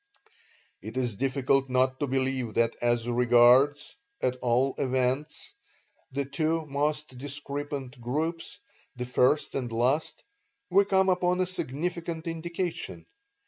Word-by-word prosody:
"It - - -7
is 125 -3 0
difficult 135 +3 +1
not 130 +1 +2
to 145 - 0
believe 130 -3 -1
that 115 0 +2
as 120 -1 +1
regards, 125 +4 +4 0.2
at 130 0 0
all 125 +2 +1
events, 130 +3 -1 0.6
the 140 +1 -2
two 155 +3 -1
most 150 0 -1
discrepant 140 -2 -5
groups, 155 +7 -3 0.4
the 125 0 -4
first 125 +4 +2
and 125 -3 -3
last, 125 +7 0 0.5
we 200 +2 +5
come 190 -1 +3
upon 180 0 +2
a 185 - +3
significant 170 0 -4
indication. 170 +2 -4
135 Hz, 120 wpm, -28 LUFS, 125-160 Hz, 0.6 s, we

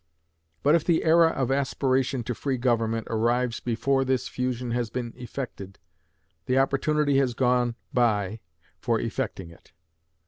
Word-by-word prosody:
But 145 - +4
if 165 -2 +3
the 170 -2 +2
era 165 +1 +5
of 135 -4 -1
aspiration 135 -2 0
to 125 - -3
free 135 +2 -2
government 115 -2 0
arrives 120 +2 0
before 135 +3 0
this 130 -1 0
fusion 125 -1 -3
has 120 -1 -1
been 120 0 -4
effected, 120 -6 -7 0.7
the 130 - +2
opportunity 140 +1 +2
has 125 -3 0
gone 125 -1 +2 0.2
by 110 -4 +1 0.4
for - - 0
effecting 85 -3 -4
it. 85 - -20
125 Hz, 140 wpm, -26 LUFS, 115-135 Hz, 0.7 s, era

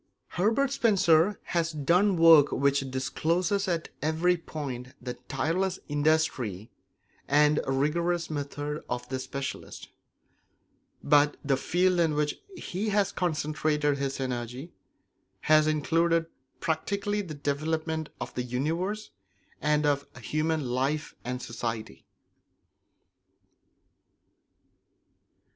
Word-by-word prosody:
Herbert 225 +9 +1
Spencer 195 - +3
has 170 -1 -1
done 175 +6 +2
work 165 -3 +7
which 140 -1 +1
discloses 170 +10 0
at 170 -3 -1
every 160 +4 +2
point 135 -7 -6
the 125 0 -5
tireless 180 +7 0
industry 145 - 0 0.6
and 150 +1 +4
rigorous 165 +6 0
method 145 0 -4
of 125 0 -3
the 130 0 -2
specialist; 135 +1 -6 1.1
but 145 0 +4
the 140 -1 +3
field 180 +6 +1
in 160 -3 +2
which 150 0 -1 0.2
he 205 - -3
has 205 -1 +2
concentrated 150 -3 0
his 140 0 -2
energy 125 +4 -4 0.7
has 155 0 +4
included 165 +2 +2 0.3
practically 200 +6 -1
the 165 -6 -7
development 155 +2 -2
of - - -6
the 125 - -2
universe 165 - -2 0.5
and 150 0 +2
of 140 -1 +1
human 155 +4 -1
life 135 +5 -1
and 125 +1 -4
society. 115 - -5
155 Hz, 100 wpm, -28 LUFS, 140-170 Hz, 1.1 s, work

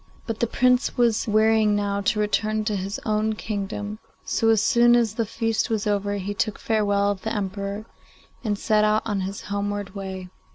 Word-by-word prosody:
But 225 -2 -4
the 235 - +1
Prince 250 +3 +2
was 235 -3 +2
wearying 215 0 +3
now 200 -1 -1
to 210 +2 +1
return 215 +1 0
to 210 -1 0
his 195 +2 -3
own 215 0 +1
kingdom, 205 0 -4 0.3
so 225 - +1
as 225 -1 +5
soon 240 0 +5
as 230 -3 +2
the 225 -1 -2
feast 225 0 -1
was 220 -2 -1
over 205 -1 0
he 200 +1 -3
took 210 +1 -1
farewell 205 -2 +1
of 195 -2 -5
the 220 - -3
Emperor, 200 +1 -3 0.6
and 210 -3 -1
set 215 0 +2
out 215 0 +2
on 205 -3 -1
his 195 +1 -4
homeward 205 -1 -3
way. 190 -2 -6
210 Hz, 190 wpm, -24 LUFS, 200-220 Hz, 0.6 s, as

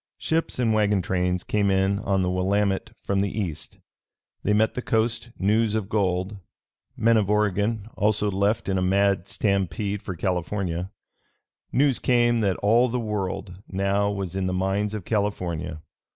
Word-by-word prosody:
Ships 165 +1 -1
and 115 -3 +2
wagon 105 -3 +2
trains 90 0 0
came 100 -1 +1
in 95 +1 +2
on 95 -2 0
the 90 - 0
Willamette 95 +2 0
from 100 0 0
the 100 0 +1
East. 85 -7 -4 0.6
They 105 - 0
met 110 +2 +3
the 125 - -3
coast 115 0 0
news 105 +2 +2
of 105 -3 -2
gold. 95 -1 0 0.6
Men 115 -1 +4
of 105 -2 +1
Oregon 105 +1 +1
also 105 0 +1
left 100 +4 0
in 95 -1 +1
a - - 0
mad 95 0 +2
stampede 100 0 -1
for 95 - -5
California. 90 0 -2 0.8
News 135 -1 +3
came 120 -1 +3
that 100 -4 +1
all 115 +4 +4
the 125 +2 -1
World 100 -4 -4
now 100 +1 0
was 100 -3 -3
in 95 -1 -1
the 90 - -1
mines 95 +3 0
of 100 -5 -6
California. 90 -6 -2
100 Hz, 160 wpm, -25 LUFS, 95-110 Hz, 0.8 s, Men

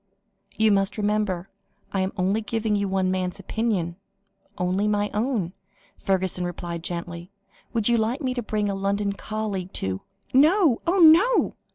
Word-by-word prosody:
"You 220 0 +4
must 195 0 +1
remember 205 -4 0 0.5
I 195 - +1
am 190 +1 -1
only 195 +4 +1
giving 220 -1 -1
you 200 -1 0
one 190 -1 +1
man's 185 -1 -2
opinion 195 -7 -2 0.6
only 185 +3 0
my 205 0 0
own," 210 -6 -1 0.5
Fergusson 190 -2 0
replied 175 -1 -4
gently. 170 0 -5 0.4
"Would 225 -3 +1
you 240 -1 +4
like 225 +5 0
me 260 -4 -1
to 245 - -2
bring 210 -2 -1
a 200 - -1
London 200 +1 -1
colleague 200 -3 -4
to 95 0 -3 0.2
" - - -39
"No 305 - +4
oh 360 +3 +2
no!" 360 +8 +6
205 Hz, 160 wpm, -24 LUFS, 185-225 Hz, 0.6 s, no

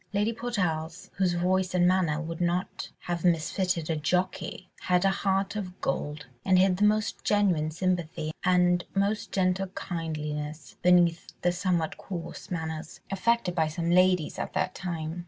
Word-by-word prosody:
Lady 210 +3 +1
Portarles, 180 -9 -2
whose 185 -2 +2
voice 185 +1 +1
and 175 0 +4
manner 180 -5 +2
would 165 +1 -5
not 175 +2 -1
have 175 -1 -3
misfitted 175 0 +1
a 160 - 0
jockey, 180 +3 -1
had 180 +1 +2
a 195 - +5
heart 195 +1 0
of 185 -3 -5
gold, 150 +2 -2 0.2
and 185 -1 +4
hid 185 0 +4
the 205 - +1
most 210 0 +2
genuine 185 -7 +2
sympathy 165 -2 -1
and 180 -1 +3
most 200 +2 0
gentle 190 0 +1
kindliness, 155 -4 -5
beneath 175 -2 +3
the 175 - +4
somewhat 175 -2 0
coarse 175 +1 -7
manners 160 -3 -4
affected 195 -1 +1
by 160 -3 +2
some 170 +2 -2
ladies 180 -2 +3
at - - -4
that 185 -1 0
time. 170 -2 -4
180 Hz, 155 wpm, -28 LUFS, 165-190 Hz, 0.2 s, a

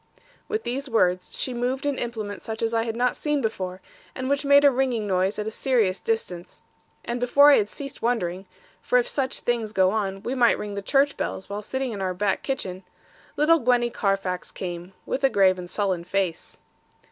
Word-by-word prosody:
With 435 +1 -2
these 270 +3 -3
words, 185 -6 +1
she 255 - -3
moved 250 +3 -2
an 285 -2 0
implement 215 -4 -4
such 220 0 -5
as 225 0 0
I 225 0 +1
had 225 -1 -3
not 245 +1 +1
seen 295 -1 0
before, 190 -6 -3 0.3
and 260 0 -3
which 280 +1 +1
made 280 0 +6
a 285 - +7
ringing 250 -4 0
noise 190 0 +1
at 210 - -2
a 220 - -3
serious 225 -7 +1
distance. 180 -6 -4 0.4
And 240 +1 -2
before 285 +4 +6
I - - +7
had 205 -1 +1
ceased 275 +2 -7
wondering 190 -6 -1 0.3
for - - +2
if - - +2
such 270 - -1
things 230 -3 -1
go 190 -2 +4
on, 195 -2 -2
we 245 - -2
might 245 -3 +4
ring 210 -1 -5
the 200 - -4
church 275 +7 +2
bells, 190 - -4
while 205 +1 -3
sitting 260 +4 -3
in 205 -3 -5
our 185 -1 -1
back 200 +1 0
kitchen 190 -9 -3 0.6
little 325 +3 +5
Gwenny 240 -2 +2
Carfax 195 -4 -1
came, 175 0 -6
with 270 - -3
a 270 - +5
grave 190 -5 +3
and 175 -1 -7
sullen 190 -4 -1
face. 185 -2 -2
225 Hz, 205 wpm, -25 LUFS, 190-260 Hz, 0.6 s, a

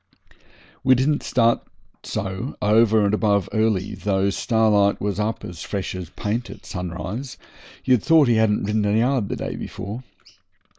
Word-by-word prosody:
We 130 0 +5
didn't 145 +4 +1
start 115 -2 +2 0.4
so 95 +7 -4
over 110 0 +4
and 100 - +1
above 100 -3 +2
early, 110 -4 +1
though 100 -1 0
Starlight 105 -2 +2
was 100 0 -2
up 110 +2 -2
as 90 -1 -8
fresh 100 -2 -4
as 90 -3 -6
paint 115 +6 -3
at - - -11
sunrise, 90 - -5 0.5
you'd 125 -4 +4
thought 160 0 +5
he 120 - +4
hadn't 110 -1 +2
ridden 105 +1 0
a 105 +1 +2
yard 120 -2 +1
the - - -2
day - - -4
before. 105 +5 -6
105 Hz, 155 wpm, -22 LUFS, 100-115 Hz, 0.5 s, We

